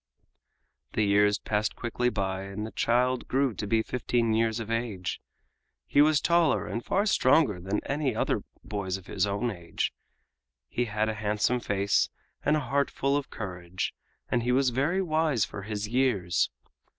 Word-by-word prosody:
The 110 - +2
years 105 0 +4
passed 105 0 -1
quickly 125 +1 -1
by 95 -4 -2
and 100 +2 -5
the 110 - -7
child 125 +2 +1
grew 135 -2 +1
to 105 +1 -4
be 110 +1 +2
fifteen 120 -2 0
years 115 0 +1
of 115 0 -5
age. 110 -6 -2 0.6
He 145 - +4
was 150 0 +5
taller 170 -1 +3
and 115 - -4
far 200 +2 +1
stronger 130 - +3
than 95 +4 -2
any 140 -4 -1
other - - 0 0.2
boys 95 -3 -3
of 95 - -14
his - - 0
own 100 +4 -1
age, 85 -4 -3 0.7
he 120 - -1
had 110 0 0
a 110 - 0
handsome 110 +3 0
face 100 -3 +1 0.3
and 150 +1 +3
a - - -1
heart 140 +2 +1
full 140 +1 0
of 145 -1 -2
courage, 90 -3 -4 0.3
and 120 - +1
he 120 +2 0
was 130 0 +3
very 155 +10 +1
wise 155 - +2
for 100 - -7
his 105 0 -4
years. 115 -7 +1
115 Hz, 170 wpm, -28 LUFS, 100-130 Hz, 0.7 s, was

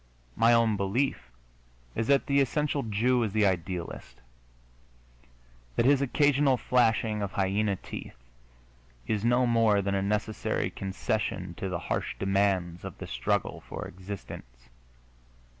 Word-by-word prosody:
My 115 +1 +4
own 115 -3 +4
belief 105 +8 -1 0.6
is 115 - -2
that 140 -1 +3
the 140 0 +3
essential 145 +2 0
Jew 120 +3 +1
is 110 -4 -1
the 110 -1 +3
idealist 90 -2 -3 1.6
that - - +2
his 140 0 +5
occasional 140 0 +3
flashing 115 -4 +2
of 100 -1 -3
hyena 100 +1 +1
teeth 90 - -9 0.9
is 105 -1 -1
no 120 +2 +3
more 115 -3 +3
than 100 0 -1
a 100 - +1
necessary 105 +2 -1
concession 95 -2 -3
to 95 - -3
the 90 - -2 0.2
harsh - - -3
demands 95 -3 0
of - - -7
the - - -7
struggle - - -1
for - - -5
existence. 85 -11 -9
105 Hz, 130 wpm, -28 LUFS, 95-120 Hz, 1.6 s, his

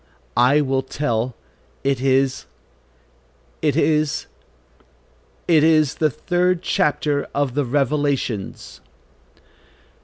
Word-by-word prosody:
I 135 +5 +4
will 135 -2 0
tell, 125 -3 -2 0.5
it 135 -2 0
is, 135 0 +1 1.1
it 150 -3 +1
is, 155 -2 +1 1.2
it 160 -3 +4
is 155 -3 +4
the 155 - +1
third 180 +4 0
chapter 145 -1 0
of 140 -3 0
the 145 +1 0
Revelations." 140 -5 -2
145 Hz, 90 wpm, -21 LUFS, 130-155 Hz, 1.2 s, I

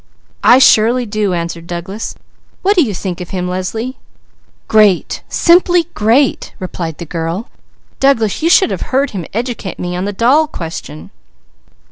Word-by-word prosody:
"I 245 - +7
surely 245 -1 +4
do!" 205 -3 -1
answered 170 0 -5
Douglas. 180 +5 -5 0.5
"What 400 +2 +3
do 360 - +5
you 250 -9 0
think 180 -1 -4
of 175 - -7
him, 180 -1 -3
Leslie?" 205 +8 -4 0.7
"Great! 210 -4 +3
Simply 350 -1 +3
great!" 235 +6 +1 0.2
cried 165 -4 -4
the 170 - -7
girl. 165 - -4 0.5
"Douglas 230 -6 +2
you 330 - +2
should 375 +1 +5
have - - -4
heard 270 +1 +1
him 180 -6 -5
educate 230 -3 -4
me 180 0 -4
on 180 +2 -2
the 205 - -2
doll 255 +10 +3
question." 165 - -8
210 Hz, 150 wpm, -15 LUFS, 180-260 Hz, 0.7 s, I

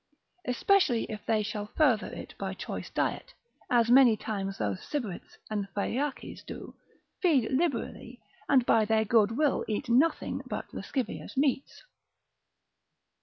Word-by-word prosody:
Especially 250 - +3
if 215 -1 -6
they 220 -2 +2
shall 210 0 -4
further 255 -9 +3
it - - -8
by - - -3
choice - - -6
diet, - - -2 0.3
as 235 -1 +3
many 245 -4 +7
times 195 -2 -4
those 100 -3 -2
Sybarites 235 -12 -5
and 205 -2 -2
Phaeaces 260 +7 -3
do, - - -9 0.5
feed 285 - +3
liberally, 260 -4 -2 0.3
and 260 -4 +5
by 225 -2 +4
their 220 0 +2
good 220 +1 +3
will 300 -2 +2
eat 215 +2 -3
nothing 275 +8 +2
else - - -11
but - - -5
lascivious 265 +2 -4
meats. 275 -1 0
235 Hz, 135 wpm, -29 LUFS, 215-275 Hz, 0.5 s, many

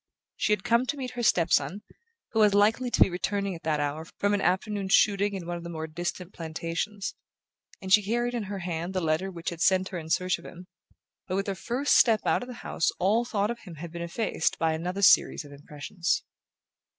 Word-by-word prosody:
She - - 0
had 210 - +1
come 235 +2 +2
to 290 - -2
meet 255 -2 -4
her 245 -1 -5
step 175 -7 +2
son, 205 +3 +1 0.5
who 225 - 0
was 210 -2 +5
likely 220 +5 +3
to - - 0
be - - +7
returning 200 +2 -1
at 165 - -9
that 155 -2 0
hour 145 +2 -2
from 205 0 +1
an 205 - +1
afternoon's 195 +1 +1
shooting 200 0 +3
in 185 -3 -5
one 175 0 -3
of 170 - -9
the 170 - -6
more 160 -2 -4
distant 175 +3 -5
plantations, 165 +5 -4 0.7
and 190 0 +1
she 210 - +8
carried 240 +4 -1
in 235 -4 -2
her 200 +1 -5
hand 175 0 -4
the - - +2
letter 165 +3 0
which 175 -2 -5
had 170 -1 -8
sent 185 +1 +3
her 180 - -4
in 160 -1 -9
search 185 +2 +1
of - - -15
him; 180 +1 -10 0.6
but 185 - -2
with 195 +1 0
her 195 - -1
first 245 +9 0
step 225 -3 +5
out - - +2
of 245 - -7
the 250 - -8
house - - +1
all 215 +6 +2
thought 210 -2 0
of 235 - -6
him 175 -5 -11
had 165 +2 -8
been 170 0 -6
effaced 170 0 -1
by 160 -1 +1
another 180 +5 -3
series 175 - +5
of 145 - -13
impressions. 150 +6 -3
190 Hz, 230 wpm, -27 LUFS, 170-210 Hz, 0.7 s, she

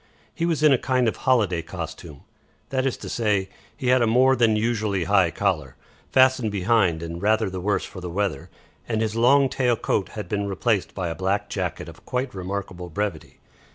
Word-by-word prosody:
He 170 -1 -1
was 160 -3 0
in 150 -2 +7
a 130 - +2
kind 130 -2 +1
of 110 - 0
holiday 105 -10 +1
costume; 80 -3 -8 0.5
that 130 0 0
is 130 - -2
to - - -9
say, 105 -4 0 0.3
he 130 -4 -1
had 130 0 +4
a 115 - +3
more 130 +4 +4
than 115 -3 +3
usually 105 -4 0
high 95 0 +3
collar, 80 -8 -1 0.4
fastened 130 -4 +4
behind 95 -4 +1
and 85 +1 -6
rather 110 -1 +2
the 90 -1 -5
worse 100 +2 0
for 95 - -10
the 90 - -5
weather, 95 -5 -2 0.4
and 110 -2 0
his 110 0 -2
long 135 +4 +5
tail 125 -2 +1
coat 100 -3 -1
had 105 - -5
been 100 -2 -2
replaced 100 0 -1
by 90 -3 -2
a - - -2
black 100 +3 -1
jacket - - -3
of - - -13
quite 125 +1 -3
remarkable 95 -1 -5
brevity. 95 -1 -4
105 Hz, 195 wpm, -24 LUFS, 95-120 Hz, 0.5 s, in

